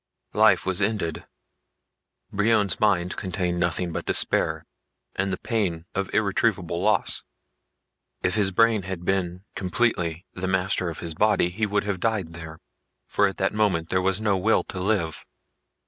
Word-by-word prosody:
XIV -, -, -4 dB
Life -, -, +5 dB
was 95 Hz, +1 st, +1 dB
ended. 100 Hz, -6 st, -1 dB, 1.0 s
Brion's 105 Hz, -1 st, +2 dB
mind 90 Hz, -4 st, +2 dB
contained 90 Hz, -3 st, -2 dB
nothing 85 Hz, 0 st, 0 dB
but -, -, -5 dB
despair -, -, +1 dB, 0.5 s
and 95 Hz, +1 st, 0 dB
the 95 Hz, -, -1 dB
pain 95 Hz, -8 st, -2 dB
of 100 Hz, 0 st, -2 dB
irretrievable 100 Hz, -4 st, +1 dB
loss. 105 Hz, +2 st, +1 dB, 1.0 s
If 90 Hz, -, +2 dB
his 105 Hz, -3 st, +2 dB
brain 115 Hz, +2 st, +3 dB
had 90 Hz, -1 st, -6 dB
been 90 Hz, -1 st, -1 dB
completely 90 Hz, -4 st, 0 dB
the 95 Hz, 0 st, -3 dB
master 95 Hz, -1 st, 0 dB
of 80 Hz, -, -7 dB
his 85 Hz, -1 st, -1 dB
body 100 Hz, 0 st, +2 dB
he 105 Hz, +4 st, -1 dB
would 105 Hz, 0 st, 0 dB
have 100 Hz, -2 st, -2 dB
died 100 Hz, -5 st, -1 dB
there, 80 Hz, -1 st, -8 dB, 0.5 s
for 100 Hz, -, +3 dB
at 95 Hz, -, -5 dB
that 95 Hz, -, 0 dB
moment 95 Hz, -6 st, +1 dB
there 95 Hz, -, +1 dB
was 95 Hz, +1 st, +1 dB
no 105 Hz, -3 st, +1 dB
will 110 Hz, +4 st, +3 dB
to 95 Hz, -, -7 dB
live. 90 Hz, -5 st, -1 dB
95 Hz, 160 wpm, -25 LUFS, 90-105 Hz, 1.0 s, Life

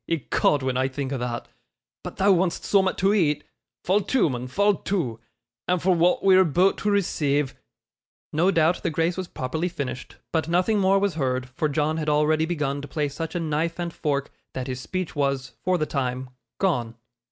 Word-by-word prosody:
Ecod, 150 Hz, -2 st, +1 dB
when 130 Hz, -1 st, 0 dB
I 130 Hz, +1 st, +2 dB
think 135 Hz, 0 st, -4 dB
o' 135 Hz, -, -2 dB
thot 120 Hz, -1 st, -4 dB, 0.6 s
but -, -, -7 dB
thou 200 Hz, +1 st, +4 dB
want'st 180 Hz, -1 st, +1 dB
soom'at 190 Hz, -2 st, +2 dB
to 195 Hz, +2 st, +3 dB
eat. 155 Hz, -8 st, +2 dB, 0.4 s
Fall 195 Hz, +3 st, +3 dB
to, 200 Hz, -, +2 dB
mun, 125 Hz, 0 st, -4 dB
fall 205 Hz, +10 st, +3 dB
to, 140 Hz, -, -2 dB, 0.5 s
and 180 Hz, 0 st, +2 dB
for 185 Hz, +2 st, +3 dB
wa'at 175 Hz, +1 st, +2 dB
we're 190 Hz, -1 st, +6 dB
aboot 180 Hz, +3 st, +3 dB
to 210 Hz, -, 0 dB
receive 150 Hz, -8 st, +1 dB, 0.4 s
' -, -, -50 dB
No 170 Hz, +5 st, +3 dB
doubt 165 Hz, -1 st, +2 dB
the -, -, 0 dB
grace 165 Hz, +2 st, 0 dB
was 185 Hz, -1 st, -4 dB
properly 160 Hz, +7 st, -3 dB
finished, 140 Hz, -6 st, -5 dB, 0.2 s
but 160 Hz, -1 st, +1 dB
nothing 185 Hz, +5 st, +2 dB
more 195 Hz, 0 st, +4 dB
was 200 Hz, -1 st, +1 dB
heard, 130 Hz, -4 st, -1 dB
for 150 Hz, +4 st, -1 dB
John 155 Hz, +2 st, 0 dB
had 155 Hz, -1 st, -1 dB
already 155 Hz, +2 st, +2 dB
begun 150 Hz, -4 st, -2 dB
to 145 Hz, -, -8 dB
play 150 Hz, -1 st, -1 dB
such 160 Hz, +3 st, -5 dB
a -, -, 0 dB
knife 165 Hz, +1 st, -1 dB
and 170 Hz, -1 st, -3 dB
fork, 140 Hz, -2 st, -2 dB, 0.2 s
that 130 Hz, -, -3 dB
his 130 Hz, -1 st, -4 dB
speech 185 Hz, +3 st, -4 dB
was, 140 Hz, -3 st, -1 dB
for 185 Hz, 0 st, +2 dB
the 155 Hz, -, 0 dB
time, 130 Hz, -3 st, -3 dB, 0.3 s
gone. 120 Hz, -12 st, 0 dB
160 Hz, 200 wpm, -25 LUFS, 140-180 Hz, 0.6 s, we're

